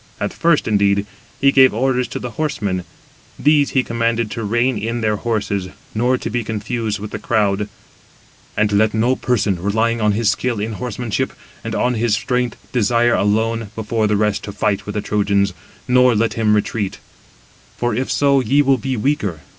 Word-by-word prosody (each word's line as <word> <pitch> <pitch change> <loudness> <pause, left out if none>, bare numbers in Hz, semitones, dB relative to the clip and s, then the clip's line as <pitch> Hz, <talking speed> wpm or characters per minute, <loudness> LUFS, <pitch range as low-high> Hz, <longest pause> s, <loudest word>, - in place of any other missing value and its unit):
At - - -2
first, 170 -3 +2
indeed, 100 -1 +2 0.3
he 140 0 +5
gave 130 -4 +5
orders 125 +1 +1
to - - -5
the 125 - -5
horsemen; 105 - -2 0.5
these 150 -1 +3
he 130 - +1
commanded 115 -2 -1
to 115 - -4
rein 120 +4 +1
in 115 +3 -3
their 110 -1 +1
horses, 100 -4 -2 0.2
nor 125 +4 +1
to - - -5
be 120 +1 -1
confused 110 0 -3
with 105 +1 -7
the - - -5
crowd. 105 -2 0 0.9
"And 105 0 +2
let 110 +1 +2
no 120 +4 +2
person, 100 -9 0
relying 110 +4 0
on 105 -1 +3
his 105 0 +2
skill 120 -4 -2
in 110 +2 -3
horsemanship, 120 0 -3 0.3
and - - -4
on 125 - +1
his 115 -2 +1
strength, 125 +1 -1
desire 120 0 +2
alone, 110 +1 0
before 110 0 -1
the 105 0 +1
rest, 105 -1 0
to 100 - -6
fight 105 0 -1
with 105 - -5
the 105 - 0
Trojans, 100 -2 +1 0.3
nor 125 -1 +4
let 115 +1 +1
him 110 -2 +2
retreat: 105 -1 -1 0.8
for 120 -1 0
[if 130 +4 -2
so], 140 -1 +3
ye 135 +4 +3
will 135 -2 +3
be 130 +3 -2
weaker. 105 - -1
115 Hz, 180 wpm, -19 LUFS, 105-125 Hz, 0.9 s, he